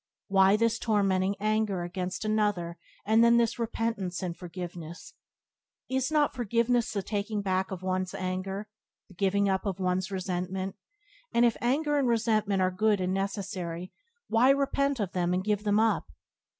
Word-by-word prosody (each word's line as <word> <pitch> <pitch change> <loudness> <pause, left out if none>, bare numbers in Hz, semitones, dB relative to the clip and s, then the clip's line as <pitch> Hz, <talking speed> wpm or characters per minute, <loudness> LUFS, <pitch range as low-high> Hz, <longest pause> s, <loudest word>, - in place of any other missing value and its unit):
Why 195 0 +5
this 230 0 +1
tormenting 195 -3 +1
anger 215 -3 0
against 185 +3 -4
another 205 -6 0 0.3
and 220 +2 +5
then 235 0 +6
this 235 0 +1
repentance 225 -5 -2
and 175 -2 -3
forgiveness? 175 -1 -8 0.8
Is 265 +2 0
not 300 -2 +2
forgiveness 235 0 +1
the 200 -2 -2
taking 205 +1 -2
back 190 -1 0
of 185 -1 -6
one's 185 0 -1
anger, 190 +2 -3 0.4
the - - -15
giving 200 +2 +1
up 190 -1 +1
of 195 -2 -3
one's 185 0 0
resentment; 185 0 -3 0.6
and 235 +1 +4
if 235 - +3
anger 290 +4 +1
and 270 - +1
resentment 215 -4 +2
are 185 - +2
good 210 +2 +2
and 185 0 0
necessary 190 -3 -4 0.3
why 235 +3 +4
repent 275 -1 +2
of 200 -4 -1
them 180 0 0
and 185 - -1
give 210 0 -1
them 205 0 +3
up? 225 0 +2
200 Hz, 160 wpm, -28 LUFS, 185-225 Hz, 0.8 s, then